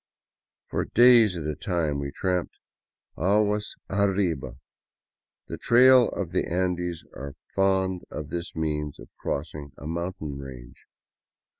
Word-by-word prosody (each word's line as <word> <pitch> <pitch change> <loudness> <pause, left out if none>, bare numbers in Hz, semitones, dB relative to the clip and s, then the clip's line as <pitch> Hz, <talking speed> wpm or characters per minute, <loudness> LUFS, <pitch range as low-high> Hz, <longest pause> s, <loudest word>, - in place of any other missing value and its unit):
For - - 0
days 120 -4 +6
at 85 - -4
a 75 - -1
time 80 -3 -1
we 70 0 -3
tramped 90 +3 -2 0.3
" - - -54
aguas 105 +4 +1
arriba." 95 -10 0 0.9
The - - -7
trails 125 +1 +6
of 95 -5 -4
the 95 - 0
Andes 90 -1 -1
are 70 +2 -8 0.2
fond 95 -1 +1
of 75 -1 -6
this 85 0 -5
means 75 -2 -2
of - - -12
crossing 70 -1 -4
a - - -10
mountain 85 -3 -4
range. 65 -3 -11
85 Hz, 130 wpm, -26 LUFS, 75-95 Hz, 0.9 s, days